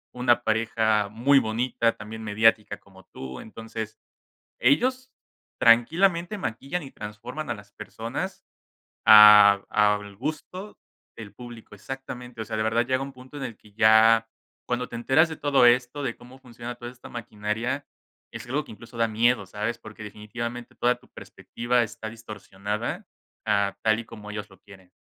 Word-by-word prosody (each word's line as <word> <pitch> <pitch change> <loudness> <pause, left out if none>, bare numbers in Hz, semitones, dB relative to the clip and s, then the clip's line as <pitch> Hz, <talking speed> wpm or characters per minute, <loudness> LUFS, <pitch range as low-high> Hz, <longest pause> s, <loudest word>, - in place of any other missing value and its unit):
una 120 -1 +2
pareja 110 -2 +1
muy 135 +6 +4
bonita, 115 +1 0
también 110 +2 -8
mediática 110 0 +2
como 95 -1 -19
tú. 65 -1 -8
Entonces, 110 0 -8 0.6
ellos 255 - +2 0.5
tranquilamente, 170 - +3
maquillan 140 - -4
y 135 - -10
transforman 120 +9 -7
a 115 - -2
las 100 0 -15
personas, - - -6 0.6
a 105 -2 +9
al 105 -1 +1
gusto 155 - -6 0.4
del 105 -3 -10
público. 120 -4 -11
Exactamente. 125 +1 -8
O - - -6
sea, 110 0 -5
de 110 - 0
verdad, 115 +2 +1
llega 130 +1 0
un 135 0 -6
punto, 130 +3 -14
en 135 - -7
el 115 -4 -6
que 105 - -21
ya 110 +1 +5 0.4
cuando 125 0 -2
te 120 - -7
enteras 135 +7 +3
de 160 - -7
todo 140 -4 +3
esto, 125 +4 +2
de 125 -4 -3
cómo 125 +2 -15
funciona 120 -1 -9
toda 120 0 -8
esta 125 - -14
maquinaria, 115 +4 -4 0.5
es - - -8
algo 140 +4 -2
que - - -15
incluso, 115 +3 -13
da 115 -1 +2
miedo, 115 +1 +2
¿sabes? 105 +4 -3
Porque 110 -1 -12
definitivamente, 115 +3 -7
toda 125 +1 +2
tu - - -24
perspectiva 120 +1 -2
está 110 -1 -6
distorsionada, 105 -1 -5 0.4
a 100 -1 +1
tal 110 0 +3
y - - -9
como 105 -2 -11
ellos 105 0 -6
lo 95 - -19
quieren. 95 -2 -17
115 Hz, 160 wpm, -25 LUFS, 105-125 Hz, 0.6 s, a